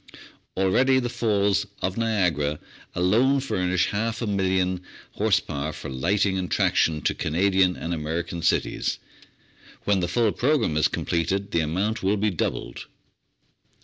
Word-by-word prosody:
Already 125 +8 +3
the 120 -2 0
Falls 105 -5 +1 0.2
of 95 0 -1
Niagara 90 -10 0 0.4
alone 115 +10 +3
furnish 90 -9 0
half 110 +2 -2
a 115 - -2
million 95 -3 0 0.3
horse 105 -2 +2
power 75 0 -4
for 70 - -8
lighting 95 +8 +1
and 90 - -3
traction 80 -2 +2
to - - +1
Canadian 95 +2 +2
and 85 - -4
American 85 +2 -3
cities; - - 0 0.9
when 100 -2 +2
the 90 - -1
full 110 +4 +2
pro 145 +9 +2
gramme 110 - -1
is 75 - +3
completed 95 +4 -2
the 85 - +1
amount 95 +8 -1
will 100 +2 +1
be 105 +1 +1
doubled. 85 - -4
95 Hz, 145 wpm, -25 LUFS, 85-105 Hz, 0.9 s, Already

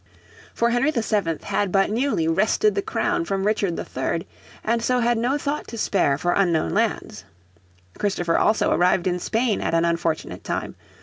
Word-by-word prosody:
For 235 0 +2
Henry 245 +5 +2
VII 210 - 0
had 200 -3 -1
but 195 +1 +2
newly 230 - 0
wrested 215 - +2
the 405 - -1
crown 350 -3 -1
from 195 -10 -2
Richard 205 -4 0
III, - - -3 0.4
and 230 +1 0
so 250 +2 +1
had 240 0 +2
no 245 +5 0
thought 290 +1 -3
to 230 - -7
spare 180 -10 +1
for 175 +4 0
unknown 175 -5 +1
lands. 205 - -1 0.8
Christopher 175 -5 0
also 215 - +2
arrived 180 0 +2
in 180 -1 0
Spain 225 +3 0
at - - 0
an 165 0 +3
unfortunate 170 -1 -2
time. - - -3
205 Hz, 170 wpm, -23 LUFS, 175-235 Hz, 0.8 s, an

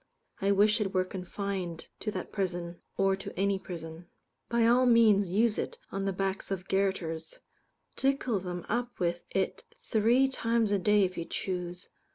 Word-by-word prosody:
I 195 +1 +3
wish 210 +2 +4
it 195 -2 -2
were 185 0 +3
confined 185 -2 -4
to 215 - -3
that 210 - -5
prison, 175 -3 -3 0.2
or 195 0 +3
to 195 - -8
any 200 0 +2
prison. 170 -2 -8 0.4
By 235 -1 +3
all 250 +2 +5
means 215 -5 +5
use 215 +4 +2
it - - -3
on 195 0 -2
the 195 - +1
backs 195 +1 -2
of 190 -1 -3
garotters. 175 -5 -1 0.6
Tickle 265 -5 +1
them 180 -1 -5
up 240 +2 -2
with 175 -1 0
it 190 -1 -1 0.2
three 235 +5 +3
times 230 -4 +1
a 200 - +3
day 210 +1 +4
if 185 -1 -1
you 165 - -3
choose. 180 -1 -4
195 Hz, 170 wpm, -30 LUFS, 180-215 Hz, 0.6 s, all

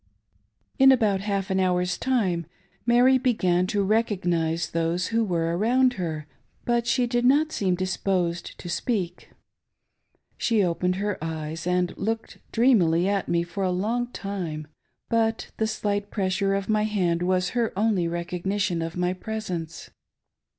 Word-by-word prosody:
In 270 0 +8
about 215 -7 +2
half 200 -2 -2
an 190 - +1
hour's 180 -1 +1
time, 190 - 0 0.4
Mary 250 +2 +5
began 185 -8 +2
to 205 +1 0
recognise 175 -6 0
those 165 +2 0
who 230 0 +2
were 170 -4 0
around 250 +6 +3
her, 160 -7 -4 0.4
but 240 -1 +1
she 250 0 +2
did 240 0 0
not 290 +5 +4
seem 185 -8 0
disposed 185 -2 -1
to - - -9
speak. 180 -1 -2 1.1
She 225 -4 +2
opened 180 +1 0
her 200 -3 -3
eyes 160 +1 -4
and 180 0 +1
looked 225 +2 -3
dreamily 190 -8 +3
at 200 -2 0
me 170 0 +2
for 175 +3 -4
a 185 - +1
long 220 +7 -1
time, 180 -9 -5 0.4
but 225 -1 0
the 220 - +1
slight 205 -1 -2
pressure 195 0 0
of 195 -1 -2
my 215 -1 +2
hand 180 -5 0
was 185 0 +1
her 235 -2 0
only 205 -5 +2
recog 170 +1 -4
nition 190 -4 0
of 165 +1 -5
my 180 0 +1
presence. 185 -5 -5
190 Hz, 150 wpm, -25 LUFS, 175-220 Hz, 1.1 s, In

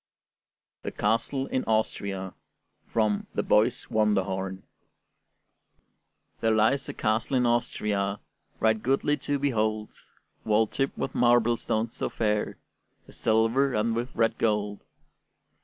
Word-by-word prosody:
THE - - -4
CASTLE 115 +5 0
IN 130 - -1
AUSTRIA 100 -4 -1 0.5
From 110 -2 0
'The - - +1
Boy's 115 +4 +2
Wonderhorn' 95 -3 0 1.8
There 115 - +1
lies 130 +6 +2
a - - -4
castle 110 +5 0
in 125 - +2
Austria, 105 -4 0 0.4
Right 110 -1 +2
goodly 135 +4 +1
to 145 +1 -1
behold, 110 -6 -1 0.5
Walled 110 0 +2
tip 135 0 -1
with - - -3
marble 120 -1 +4
stones 110 0 -2
so - - -2
fair, 105 -1 -1 0.5
With - - -16
silver 115 +5 +2
and 115 +2 +1
with 120 +2 -2
red 115 -1 +1
gold. 105 -2 0
110 Hz, 120 wpm, -27 LUFS, 105-120 Hz, 1.8 s, marble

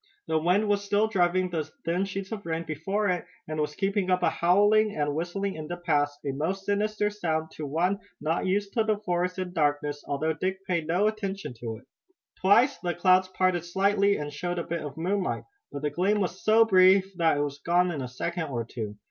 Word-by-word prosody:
The 160 - +1
wind 180 +6 +2
was 205 0 +1
still 205 +1 +2
driving 185 -2 +1
the 160 -2 -1 0.2
thin 175 +4 +1
sheets 195 0 -5
of 215 -2 -5
rain 165 0 -2
before 195 +7 -2
it, 180 -2 0 0.2
and 155 0 -4
was 150 0 -2
keeping 195 -1 0
up 180 0 +2
a - - +3
howling 205 +4 +3
and 145 -1 0
whistling 175 +5 -2
in 155 -1 -7
the 175 - -4
pass, 145 -4 0
a 140 - 0
most 175 +8 -3
sinister 210 +1 0
sound 160 -6 -2
to 150 - -6
one 180 +7 0 0.2
not 160 +4 -1
used 200 +1 0
to 225 - +2
the 215 -1 +1
forest 180 -2 -1
and 185 -1 -4
darkness, 145 -2 0
although 155 +3 0
Dick 190 +4 -3
paid 170 -4 -1
no 180 +5 +2
attention 200 - -2
to 115 -2 -5
it. - - -18 0.5
Twice 205 +4 +4
the 175 -1 -2
clouds 185 +1 +4
parted 185 -2 +1
slightly 200 +3 +2
and 145 0 -5
showed 175 +4 -3
a 170 - -1
bit 170 0 -3
of 145 -1 -7
moonlight, 185 +3 -1 0.3
but 140 - -6
the 150 - 0
gleam 195 +7 +1
was 185 -1 -3
so 225 +1 +6
brief 190 -1 +5
that 165 -4 +3
it - - +1
was 145 -1 -4
gone 175 +3 +2
in 150 -5 -4
a 130 - -4
second 165 +7 -3
or 120 -4 -3
two. 110 -3 -6
180 Hz, 215 wpm, -27 LUFS, 155-200 Hz, 0.5 s, so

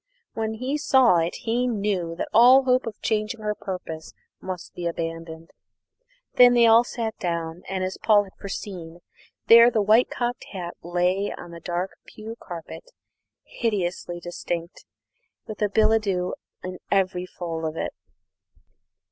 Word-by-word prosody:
When 220 0 -2
he 260 +6 -2
saw 260 - +5
it 165 +1 0
he 240 +2 +1
knew 200 -7 -1
that - - -3
all 255 +4 +7
hope 255 -1 +2
of 215 -2 -6
changing 220 +1 -1
her 210 0 -1
purpose 180 -6 -7 0.3
must 185 -2 -6
be 175 -1 -4
abandoned. 165 -1 -5 0.9
Then 245 -1 +8
they 235 -1 +6
all 230 +1 +7
sat 230 -3 -4
down, 170 -1 -3
and, 190 -1 -2
as 185 0 -4
Paul 210 -2 +5
had 195 - -15
foreseen, 175 -4 -7 0.4
there 235 +1 +8
the 225 - 0
white 220 +4 +4
cocked 245 0 -3
hat 175 -3 -5
lay 180 +3 0
on 175 - -9
the 170 - -9
dark 175 +2 -3 0.2
pew 220 +1 -9
carpet, 175 - -9 0.5
hideously 180 -6 -2
distinct, 175 0 -5 0.6
with 215 - -8
billet 220 +1 +4
doux 180 -3 -1 0.3
in 185 0 -6
every 185 -2 +1
fold 165 -3 -5
of 160 0 -3
it! - - -3
195 Hz, 150 wpm, -24 LUFS, 175-225 Hz, 0.9 s, Then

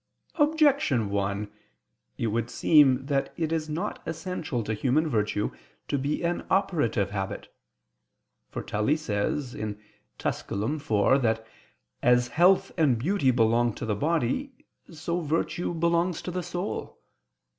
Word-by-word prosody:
Objection 285 - +3
1: 100 +1 -1 0.7
It - - -2
would 115 +1 -1
seem 135 -4 +4
that 140 -1 0
it 160 -2 -1
is 155 -1 -1
not 170 +7 -3
essential 160 -8 -3
to 110 - -2
human 135 +8 +1
virtue 105 -5 0 0.4
to 140 - 0
be 145 +5 -1
an 170 +1 -1
operative 145 - +1
habit. 95 -2 -5 1.0
For - - -5
Tully 105 +9 +1
says 125 0 -2 0.6
(Tuscul. 110 +9 -2 0.4
iv) 140 - +1
that 110 -2 0 0.6
as 125 0 +4
health 180 +4 +4
and 140 -7 +4
beauty 150 - +1
belong 120 -1 +3
to - - -5
the 110 - 0
body, 165 - -1 0.2
so 170 +2 -3
virtue 165 +3 -1
belongs 170 +1 +1
to 180 - -4
the 180 +1 -2
soul. 180 +2 -5
145 Hz, 130 wpm, -27 LUFS, 115-170 Hz, 1.0 s, seem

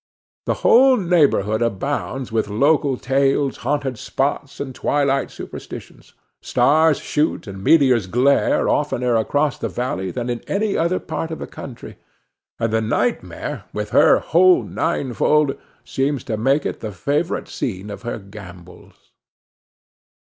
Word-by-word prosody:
The - - +1
whole 260 +2 +6
neighborhood 145 - +2
abounds 130 +3 -2
with 110 -1 0
local 140 +5 +2
tales, 135 +1 +1
haunted 135 0 -2
spots, 140 0 -2
and 135 -2 -5
twilight 140 -1 0
superstitions; - - -10 0.3
stars 150 +5 +3
shoot 150 0 -1
and 95 -2 -8
meteors 130 - +4
glare 125 +8 +2
oftener 125 -1 0
across 145 +6 0
the - - -3
valley 110 -7 -3
than 120 +4 -4
in 120 -1 -3
any 205 +1 0
other 170 +3 +1
part 165 - -4
of 160 - -5
the - - -6
country, 125 -4 -10 0.6
and 115 -1 -1
the 110 - +2
nightmare, 115 - -2
with - - -4
her - - +6
whole 365 -1 +4
ninefold, 140 +3 0 0.3
seems 135 0 -1
to 115 - -3
make 135 +7 +1
it - - -3
the 110 - -5
favorite 145 - -2
scene 100 -2 -5
of 100 - -8
her 120 0 -4
gambols. 95 -4 -14
135 Hz, 135 wpm, -20 LUFS, 110-145 Hz, 0.6 s, whole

